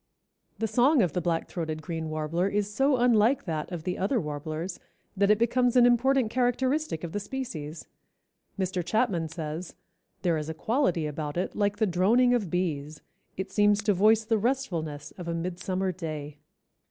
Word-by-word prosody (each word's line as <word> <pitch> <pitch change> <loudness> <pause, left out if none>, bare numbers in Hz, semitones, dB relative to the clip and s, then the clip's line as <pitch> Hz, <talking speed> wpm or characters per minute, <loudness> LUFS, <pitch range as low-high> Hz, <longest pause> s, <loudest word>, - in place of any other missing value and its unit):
The 225 - -1
song 245 +4 +4
of 170 -5 -1
the 180 - 0
Black 165 -1 -1
throated 155 -3 -4
Green 160 -2 -4
Warbler 155 +4 -1
is 205 0 -1
so 270 +3 +3
unlike 240 +1 +3
that 160 -2 -3
of 170 -3 -5
the 180 +1 -3
other 210 +6 +1
warblers 155 +3 -4 0.4
that 200 +1 +2
it 210 - +5
becomes 245 +2 +2
an 245 -1 +7
important 245 0 +3
characteristic 255 - 0
of 170 - -4
the 205 - -2
species. 170 - -6 0.7
Mr. 185 -2 -1
Chapman 195 -5 0
says, 160 +1 -6 0.5
"There 170 -3 +2
is 150 +1 -5
a 160 - -4
quality 225 - +1
about 150 +1 -4
it 180 - -2
like 205 -1 0
the 220 - +2
droning 215 +7 +3
of 215 -7 0
bees; 155 -4 -2 0.4
it 190 +1 -4
seems 205 0 +3
to 210 -1 +3
voice 215 +3 +4
the 225 -1 +1
restfulness 170 - -2
of 175 - -6
a 170 - -1
midsummer 185 +2 -2
day." 155 -4 -6
185 Hz, 175 wpm, -27 LUFS, 160-230 Hz, 0.7 s, an